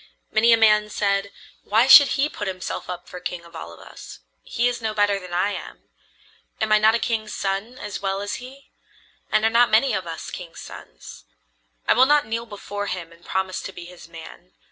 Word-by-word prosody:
Many 230 +2 +4
a 230 - +7
man 210 -1 +4
said: 200 -1 -1 0.3
"Why 220 +4 +3
should 275 +1 +8
he 275 +2 +2
put 205 -9 -6
himself 185 -1 -5
up 180 -1 -6
for 180 - -9
king 175 -1 -6
of 170 0 -16
all 125 - -8
of 85 - -14
us? - - -12 0.2
He 240 +1 -1
is 245 -1 -3
no 220 -1 -3
better 205 -1 +2
than 180 -2 -11
I 180 +4 0
am. - - -9 0.7
Am 220 0 -1
I 215 - +6
not 220 +1 +4
a - - +3
king's 220 -2 -2
son 200 +6 -3
as 210 -4 -6
well 195 0 -1
as 205 0 -4
he? 265 +3 -13 0.6
And 215 0 +2
are 225 - +3
not 235 +1 +4
many 225 +5 +3
of 185 -2 -3
us 165 -1 -7
kings' 175 -2 -9
sons? - - -12 0.6
I - - +5
will 260 - +5
not 295 0 +4
kneel 230 +2 -4
before 205 -1 -6
him 175 -3 -5
and 170 +1 -19
promise 190 0 -2
to - - -7
be 175 -2 -10
his 175 -1 -13
man. 170 +2 -12
205 Hz, 215 wpm, -23 LUFS, 180-225 Hz, 0.7 s, should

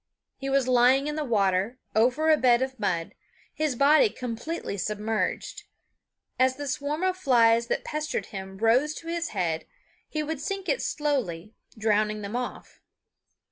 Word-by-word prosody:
He 275 - -5
was 270 -2 +2
lying 255 +2 +4
in 300 0 -2
the 310 - -1
water, 200 -2 +1 0.2
over 255 +8 +3
a - - +7
bed 250 -3 +4
of 260 -2 -5
mud, 175 -5 -1 0.4
his 305 -4 -1
body 300 - +5
completely 250 - -5
submerged. 210 +3 -2 0.7
As 260 0 +3
the 290 +1 -6
swarm 290 +5 -2
of 375 -1 +1
flies 235 -8 +3
that - - -1
pestered 305 0 -3
him 190 -1 -8
rose 250 +8 +2
to 330 - -9
his 335 0 -2
head 170 -5 -2 0.4
he 305 -1 -2
would 300 -1 -4
sink 390 +4 -4
it - - +1
slowly, 225 - -2 0.2
drowning 215 -1 +1
them 200 +3 -5
off. 250 0 -6
250 Hz, 155 wpm, -26 LUFS, 215-300 Hz, 0.7 s, a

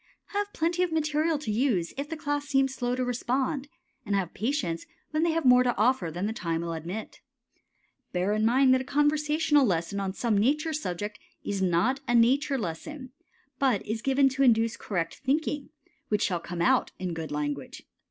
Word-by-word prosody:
Have 410 0 -2
plenty 335 +1 0
of 360 -2 +1
material 310 0 +1
to 285 -7 -4
use 210 -7 +1
if 280 +2 -4
the 325 - -4
class 290 -1 -2
seem 270 -1 +3
slow 250 -2 -2
to 255 0 -1
respond, 260 +3 -1 0.4
and 205 -1 -1
have 190 -3 -1
patience 205 - -2 0.2
when 310 0 0
they 335 - +3
have 325 -1 0
more 250 0 +7
to 245 -1 +1
offer 220 -5 +2
than 175 +5 -3
the 220 - -1
time 165 -5 -2
will 170 0 -3
admit. 175 +7 -6 0.9
Bear 185 +3 0
in 215 0 0
mind 255 +3 +5
that 260 - +3
a - - -4
conversation 295 +2 +2
lesson 185 -2 0
on 195 -1 -2
some 225 +2 0
nature 300 +10 +2
subject 205 - -4 0.2
is 200 -1 -2
not 190 +9 +2
a 240 - +2
nature 270 +4 +3
lesson, 255 - -6 0.5
but 255 -8 +2
is 220 +1 -3
given 270 +1 +3
to 270 +1 -3
induce 230 -3 +4
correct 170 -5 -3
thinking, 290 +1 -1 0.4
which 210 -1 +1
shall 180 -3 0
come 170 0 -4
out - - +3
in 180 -2 -3
good 160 -1 -5
language. 145 -2 -4
250 Hz, 190 wpm, -28 LUFS, 190-290 Hz, 0.9 s, more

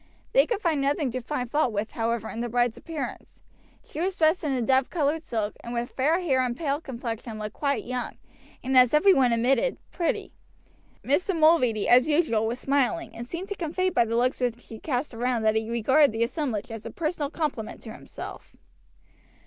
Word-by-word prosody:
They - - +5
could 460 -4 -1
find 320 -5 +1
nothing 280 -1 0
to 255 - -3
find 250 0 -3
fault 295 -5 +2
with, 210 +1 -3
however, 225 -1 -2
in 230 - -5
the 240 - -2
bride's 240 0 +1
appearance. 320 -4 -7 0.5
She 310 - -6
was 375 +1 -1
dressed 320 +3 +3
in 300 - 0
a 260 - 0
dove 260 +2 +2
colored 310 -1 0
silk, 215 -5 -2
and 235 0 -5
with 235 +1 -2
her - - -27
fair 310 +7 +2
hair 270 -7 +2
and 245 -1 -1
pale 290 -1 -1
complexion 235 -4 -6
looked 210 0 -5
quite 280 -1 -1
young, 250 0 -4 0.5
and, 260 +1 -1
as 250 +2 +6
every 385 +6 +6
one 255 -5 +3
admitted, 260 - +2
pretty. 340 -2 -2 0.7
Mr. 335 +6 +1
Mulready, 305 -10 +4
as 250 +3 +6
usual, 295 -9 +2
was 235 +2 -2
smiling, 280 +5 0
and 235 +1 -7
seemed 345 +8 -6
to 405 - -3
convey 370 +2 -1
by 240 - +3
the 230 +1 -1
looks 250 +2 +1
which 245 -1 -2
he 225 - -8
cast 265 -2 -2
round 235 -1 -1
that 215 - +4
he 220 0 -1
regarded 260 +5 +4
the 225 +1 +1
assemblage 245 -4 -3
as 225 -1 -7
a - - -6
personal 310 -3 -2
compliment 295 -9 -3
to 220 - -8
himself. - - -10
260 Hz, 205 wpm, -26 LUFS, 235-310 Hz, 0.7 s, as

